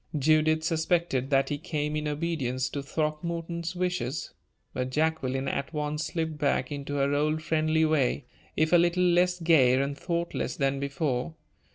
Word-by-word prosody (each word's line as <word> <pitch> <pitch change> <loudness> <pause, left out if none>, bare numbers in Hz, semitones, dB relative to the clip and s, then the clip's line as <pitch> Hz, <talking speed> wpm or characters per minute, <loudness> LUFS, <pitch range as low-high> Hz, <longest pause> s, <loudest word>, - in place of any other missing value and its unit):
Judith 155 +2 +3
suspected 160 -4 0
that 135 -1 +2
he 145 -1 -2
came 150 -1 -2
in 150 0 -2
obedience 145 -5 -1
to 140 - -4
Throckmorton's 165 +4 -3
wishes. 180 -7 -2 0.4
But 125 0 -2
Jacqueline 135 -2 0
at 140 +4 -3
once 150 0 -2
slipped 160 -3 -3
back 140 -3 0
into 145 0 -4
her 140 0 +1
old 155 +2 0
friendly 160 0 +2
way, 145 -4 +1 0.3
if 155 +2 +2
a - - +9
little 175 +1 +3
less 180 0 +3
gay 140 -7 +4
and 140 +1 -1
thoughtless 170 +2 -2
than 135 -1 0
before. 140 +1 -2
155 Hz, 155 wpm, -28 LUFS, 140-165 Hz, 0.4 s, a